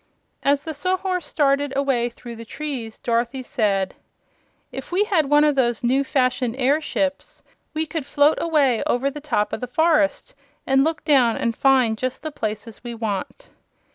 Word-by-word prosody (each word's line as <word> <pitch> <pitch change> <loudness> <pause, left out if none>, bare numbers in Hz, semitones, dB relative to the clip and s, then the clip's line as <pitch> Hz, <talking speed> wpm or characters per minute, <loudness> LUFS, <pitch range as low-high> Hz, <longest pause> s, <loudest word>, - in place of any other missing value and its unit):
As 280 0 +2
the 315 - -5
Sawhorse 365 +2 -1
started 280 -1 +1
away 265 -4 +1
through 235 0 -10
the 230 - -9
trees 245 -3 -6
Dorothy 240 +2 -1
said: 200 -7 0 0.8
"If - - -8
we 375 +4 +3
had 360 -9 +1
one 295 0 +5
of 300 -1 +4
those 240 -4 0
new 260 +3 +2
fashioned 255 -3 0
airships 285 +1 -1 0.3
we 315 +1 0
could 305 -2 -5
float 290 +2 +3
away 290 -8 +2
over 270 +3 +1
the 295 - -8
top 210 -8 -1
of - - -3
the 250 - -3
forest, 305 +1 +1 0.3
and 270 0 +3
look 320 0 -1
down 260 -7 +3
and 230 -1 -1
find 255 -5 +3
just 255 +2 -3
the 310 - -4
places 215 -3 -5
we 240 -1 -6
want." 220 - -4
270 Hz, 170 wpm, -22 LUFS, 235-300 Hz, 0.8 s, one